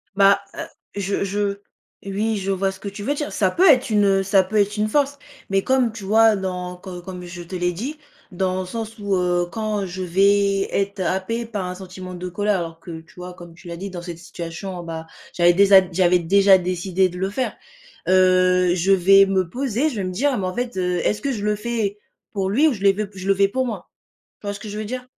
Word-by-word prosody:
Bah, 200 0 +5
heu, - - -5 0.4
je 200 +1 -1
je 200 0 -2 0.4
oui, 210 +3 -1
je 195 0 -4
vois 195 0 0
ce 190 - -13
que 205 - -7
tu 200 +1 -8
veux 280 - 0
dire, 295 0 -4
ça 190 -3 +1
peut 370 - +5
être 260 -4 +4
une, 205 -1 +3
heu, 195 -1 +3
ça 195 0 +4
peut 190 +4 -7
être 205 0 +2
une 210 0 0
force 285 +2 +1 0.3
mais 195 0 +3
comme 255 0 +2
tu 220 -2 -9
vois? 220 +2 +5
Dans 180 -2 -4
co 180 0 -9
comme 180 0 -8
je 175 0 -8
te 175 +2 -8
l'ai 180 0 0
dit, 260 - -5 0.3
dans 185 0 -1
le - - -5
sens 225 +3 -6
où, 200 -2 -1
heu, 175 -1 +1
quand 215 -2 -2
je 185 0 -6
vais 195 +2 +2
être 200 0 -1
happé 190 +6 -1
par 210 -4 -4
un 180 0 -5
sentiment 185 -1 -9
de 180 +1 -6
colère 205 +3 0
alors 165 -1 -6
que, 165 -2 -8
tu 160 - -22
vois? 180 0 -8
Comme 175 -1 -12
tu 175 +2 -15
l'as 170 0 -6
dit, 195 +3 -6
dans 175 -1 -6
cette 170 -1 -7
situation, 175 +2 -7
bah, 165 -1 -6 0.3
j'avais 175 0 +4
déza 195 +1 +7
j'avais 180 0 +3
déjà 195 +3 +5
décidé 185 +1 0
de 180 0 -9
le 190 +1 -1
faire, 250 +6 -2 0.5
heu, 185 -1 +4
je 185 +2 +1
vais 195 +1 +6
me 190 -2 +1
poser, 260 - -1
je 270 - -7
vais 200 - -2
me 185 - -3
dire: 270 +9 +1
«Mais, 190 -2 -2
en 185 - -4
fait, 245 0 -3
heu, 180 -1 0
est-ce 210 - 0
que 280 - -1
je 210 -5 -4
le 210 0 +1
fais 210 -2 -2 0.3
pour 195 -2 -1
lui 275 +11 +4
ou 300 - +2
je 205 - -9
le 200 0 +6
v 210 +2 -3
je 190 0 -7
le 195 - +4
fais 195 0 +4
pour 260 +6 -1
moi», 210 -7 -6 0.5
tu 205 - -9
vois 205 - -1
ce 205 - -8
que 215 - -7
je 205 - -6
veux 215 - -4
dire? 250 +3 -5
195 Hz, 250 wpm, -22 LUFS, 180-210 Hz, 0.5 s, déza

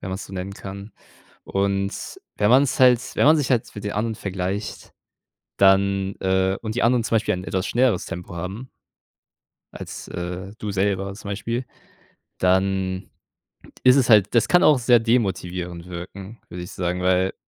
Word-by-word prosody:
wenn - - -6
man's 95 +2 -5
so - - -13
nennen 95 +1 -5
kann, 100 +1 -9 0.5
und 100 0 -2 0.2
wenn 105 - +2
man's 130 +1 +4
halt 125 -2 +7 0.2
wenn - - +3
man 155 +2 +7
sich 145 -4 -1
halt 120 -3 +1
für 105 - -9
die 105 0 -4
anderen 110 +2 -1
vergleicht, 95 +2 -4 0.7
dann 95 0 +3
äh, 95 0 +1
und 110 -1 -4
die 125 - 0
anderen 120 -1 +3
zum 115 - 0
Beispiel 110 -1 +1
ein 90 - -6
etwas 95 +2 -2
schnelleres 120 -6 +2
Tempo 85 0 -7
haben 95 +9 -6 1.1
als, - - -8
äh, 90 +2 -6
du 105 - -4
selber 100 0 -1
zum 100 0 -8
Beispiel, 115 +5 -3 0.8
dann 95 0 +1 0.7
ist 130 +1 +6
es 130 -2 +2
halt 105 -3 +5
das 115 - +4
kann 180 - +4
auch 150 -4 +5
sehr 120 0 +5
demotivierend 90 -7 -1
wirken, 95 +5 -9
würde 90 0 -7
ich 90 - -9
sagen, 90 -1 -2
weil 95 +1 +2
100 Hz, 170 wpm, -23 LUFS, 95-115 Hz, 1.1 s, halt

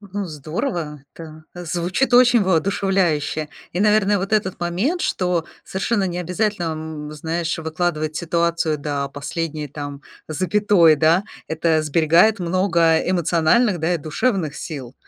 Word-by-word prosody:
Ну, 200 -1 -5
здорово, 155 - -4
да, 160 -1 -10
звучит 175 - -1
очень 245 -1 +6
воодушевляюще. 185 -4 0 0.2
И, 180 - -2
наверное, 210 -1 +3
вот 195 +3 -4
этот 200 -5 0
момент, 190 - -1
что 180 - 0 0.2
совершенно 200 +2 -1
не 175 -1 -4
обязательно, 180 +2 -1
м, 155 -1 -5
знаешь, 165 +2 -3
выкладывать 155 -1 -2
ситуацию 170 -1 0
до 140 -1 -3
последней 150 +2 -4
там 145 0 -7 0.3
запятой, 185 0 +3
да, 160 +6 +3 0.2
это 160 0 +1
сберегает 165 +7 +3
много 170 -2 +2
эмоциональных, 175 +5 +2
да, 165 +3 +1
и - - -1
душевных 160 - -1
сил. 140 -7 -7
170 Hz, 125 wpm, -21 LUFS, 155-190 Hz, 0.3 s, очень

